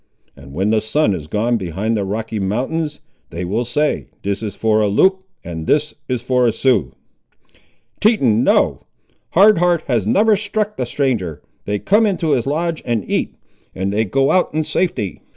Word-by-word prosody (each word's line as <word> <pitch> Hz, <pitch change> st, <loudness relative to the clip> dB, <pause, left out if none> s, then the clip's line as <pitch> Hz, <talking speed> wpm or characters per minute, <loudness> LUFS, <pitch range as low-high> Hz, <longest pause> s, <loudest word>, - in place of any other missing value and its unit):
and 70 Hz, -1 st, -14 dB
when 95 Hz, +8 st, 0 dB
the 110 Hz, -1 st, +2 dB
sun 110 Hz, 0 st, +1 dB
is 80 Hz, -5 st, -6 dB
gone 115 Hz, +6 st, 0 dB
behind 100 Hz, +4 st, -2 dB
the 105 Hz, -, -1 dB
Rocky 110 Hz, +2 st, -3 dB
Mountains, 140 Hz, +10 st, -2 dB, 0.3 s
they 85 Hz, +2 st, -5 dB
will 105 Hz, +7 st, -1 dB
say, 145 Hz, +6 st, -1 dB, 0.2 s
This 100 Hz, +1 st, -2 dB
is 105 Hz, -3 st, -5 dB
for 110 Hz, -1 st, +2 dB
a 105 Hz, -, +2 dB
Loup 190 Hz, -, +3 dB, 0.2 s
and 80 Hz, -2 st, -6 dB
this 150 Hz, 0 st, +1 dB, 0.3 s
for 125 Hz, -1 st, +2 dB
a -, -, +3 dB
Sioux." 110 Hz, -, +1 dB, 1.1 s
"Teton—no! 130 Hz, -, +3 dB, 0.5 s
Hard 200 Hz, +1 st, +6 dB
Heart 175 Hz, -2 st, +2 dB
has 115 Hz, -6 st, 0 dB
never 210 Hz, -, +4 dB
struck 210 Hz, +1 st, -2 dB
the -, -, -3 dB
stranger. 115 Hz, -, -2 dB, 0.2 s
They 105 Hz, 0 st, -1 dB
come 210 Hz, -, +3 dB
into 175 Hz, -6 st, 0 dB
his 125 Hz, -2 st, +1 dB
lodge 165 Hz, +3 st, -1 dB
and 115 Hz, -6 st, -2 dB
eat, -, -, -1 dB, 0.4 s
and 95 Hz, +2 st, -2 dB
they 110 Hz, +2 st, +2 dB
go 135 Hz, +6 st, +1 dB
out 185 Hz, -, +2 dB
in 155 Hz, -, +1 dB
safety. 165 Hz, -, -2 dB
120 Hz, 170 wpm, -18 LUFS, 100-160 Hz, 1.1 s, Hard